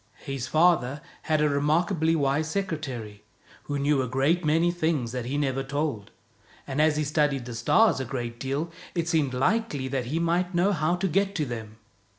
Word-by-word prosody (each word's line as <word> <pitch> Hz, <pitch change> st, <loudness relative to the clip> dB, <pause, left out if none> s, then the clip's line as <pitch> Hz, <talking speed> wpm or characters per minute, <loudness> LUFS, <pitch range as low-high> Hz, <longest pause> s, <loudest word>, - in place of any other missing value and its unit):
His 135 Hz, -2 st, -4 dB
father 155 Hz, -5 st, +3 dB, 0.2 s
had 155 Hz, -1 st, +1 dB
a 150 Hz, -, +4 dB
remarkably 160 Hz, +3 st, +1 dB
wise 145 Hz, +1 st, +1 dB
secretary, 135 Hz, -, -4 dB, 0.4 s
who 145 Hz, -, -2 dB
knew 140 Hz, 0 st, +2 dB
a 130 Hz, -, -2 dB
great 140 Hz, +8 st, +1 dB
many 165 Hz, +3 st, +3 dB
things 160 Hz, -8 st, -1 dB
that 125 Hz, -1 st, -4 dB
he 135 Hz, +4 st, -2 dB
never 135 Hz, -2 st, 0 dB
told, 140 Hz, -6 st, -3 dB, 0.6 s
and 135 Hz, +3 st, -1 dB
as 155 Hz, -1 st, +3 dB
he 155 Hz, -, +1 dB
studied 145 Hz, -3 st, 0 dB
the 120 Hz, -, -6 dB
stars 135 Hz, -, +3 dB
a 130 Hz, -, -2 dB
great 120 Hz, -2 st, -5 dB
deal, 140 Hz, +5 st, -2 dB, 0.2 s
it 170 Hz, -1 st, -1 dB
seemed 155 Hz, -7 st, +1 dB
likely 145 Hz, -, 0 dB
that 130 Hz, -2 st, -2 dB
he 145 Hz, +7 st, -2 dB
might 175 Hz, +2 st, 0 dB
know 180 Hz, +4 st, +3 dB
how 165 Hz, -1 st, +1 dB
to 190 Hz, +2 st, -1 dB
get 195 Hz, +3 st, 0 dB
to 155 Hz, -, 0 dB
them. 110 Hz, -3 st, -7 dB
150 Hz, 185 wpm, -26 LUFS, 130-165 Hz, 0.6 s, a